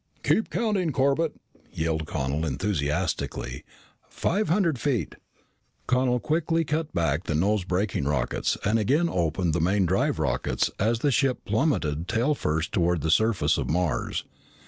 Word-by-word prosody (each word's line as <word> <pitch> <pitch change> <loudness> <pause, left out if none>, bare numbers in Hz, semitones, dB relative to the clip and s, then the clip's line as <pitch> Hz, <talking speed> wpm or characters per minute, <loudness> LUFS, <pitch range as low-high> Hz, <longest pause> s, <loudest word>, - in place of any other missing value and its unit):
"Keep 220 - +2
counting, 205 -8 0
Corbett!" 140 +4 +1 0.4
yelled 80 -1 -2
Connel 70 +1 -2
enthusiastically. 75 -5 -2 0.5
"Five 205 +5 -1
hundred 170 - +2
feet!" 130 -5 -1 0.7
Connel 125 -1 +2
quickly 165 +3 0
cut 155 +1 -2
back 80 0 0
the 80 - -1
nose 100 +5 +2
braking 90 -4 -1
rockets 70 -4 0
and 110 +2 +2
again 145 - +2
opened 85 - 0
the 80 - 0
main 95 +3 +2
drive 95 +3 +1
rockets - - 0
as 115 +3 +1
the 145 - +2
ship 130 +1 +1
plummeted 85 - 0
tailfirst 110 - 0
toward 85 -3 +1
the 80 +2 0
surface 110 +2 +2
of - - -3
Mars. 80 -6 -1
100 Hz, 140 wpm, -26 LUFS, -, 0.7 s, Keep